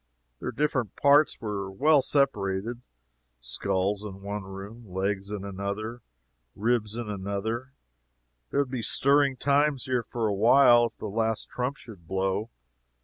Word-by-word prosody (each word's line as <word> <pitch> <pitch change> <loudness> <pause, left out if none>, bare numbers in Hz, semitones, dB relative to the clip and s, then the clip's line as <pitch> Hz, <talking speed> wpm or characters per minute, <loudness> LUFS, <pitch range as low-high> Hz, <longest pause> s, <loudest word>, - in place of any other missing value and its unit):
"Their - - -3
different 130 -8 -1
parts 145 +2 +4
are 100 -3 -3
well 145 +9 +4
separated 120 -5 0 0.6
skulls 95 - -1
in 100 -2 -8
one 100 +1 -4
room, 100 +5 -9
legs 95 +2 -2
in 100 -1 -4
another, 100 +4 -4 0.5
ribs 110 0 0
in 120 -2 -4
another 105 +6 -3 0.8
there 140 - +2
would 135 -3 -3
be 130 -3 -2
stirring 140 +2 +3
times 140 0 +2
here 125 -2 +1
for 115 0 -3
a 105 - 0
while 120 +3 +6
if - - -16
the - - -7
last 110 +1 -1
trump 125 +3 -2
should 95 -8 -13
blow. 95 +3 -1
110 Hz, 145 wpm, -27 LUFS, 100-130 Hz, 0.8 s, while